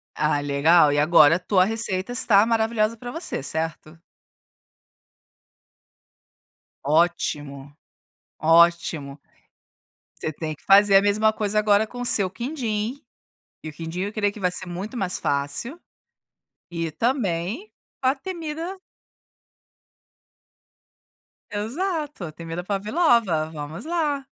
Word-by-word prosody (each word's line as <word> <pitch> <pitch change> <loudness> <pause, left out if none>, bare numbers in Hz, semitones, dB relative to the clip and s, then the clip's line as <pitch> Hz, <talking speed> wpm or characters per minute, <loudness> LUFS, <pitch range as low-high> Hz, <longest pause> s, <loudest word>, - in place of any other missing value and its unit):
Ah, 150 -1 +1
legal! 145 +2 +4
E 145 - +1
agora 155 0 +6
a - - -11
tua 185 0 +2
receita 215 -1 0
está 220 -4 +4
maravilhosa 225 -1 +1
pra 245 +2 -8
você, 330 - -4
certo? 160 +2 -4 2.9
Ótimo, 145 -3 -1 0.7
ótimo. 165 -3 +2 1.0
Você 155 - -3
tem 155 0 -5
que - - -28
fazer 200 0 +6
a 195 - +5
mesma 215 +2 +2
coisa 215 0 0
agora 210 0 +3
com 245 +1 -8
o - - -3
seu 200 -5 +3
quindim, 235 - -4 0.6
e 155 - -6
o 155 - -11
quindim 165 +3 -6
eu 205 +2 -3
creio 205 -2 0
que 215 - -11
vai 180 -2 0
ser 185 - -2
muito 190 +8 -6
mais 190 -4 -2
fácil, 145 - -2 0.9
e 165 -1 -3
também, 225 - -2 0.3
a 260 +2 +2
temida 330 +2 -6 2.8
Exato, 295 - -3
a 155 - -7
temida 165 +2 -7
Pavlova, 205 - +1
vamos 155 - -8
lá. 305 -5 -1
200 Hz, 115 wpm, -23 LUFS, 165-235 Hz, 2.9 s, agora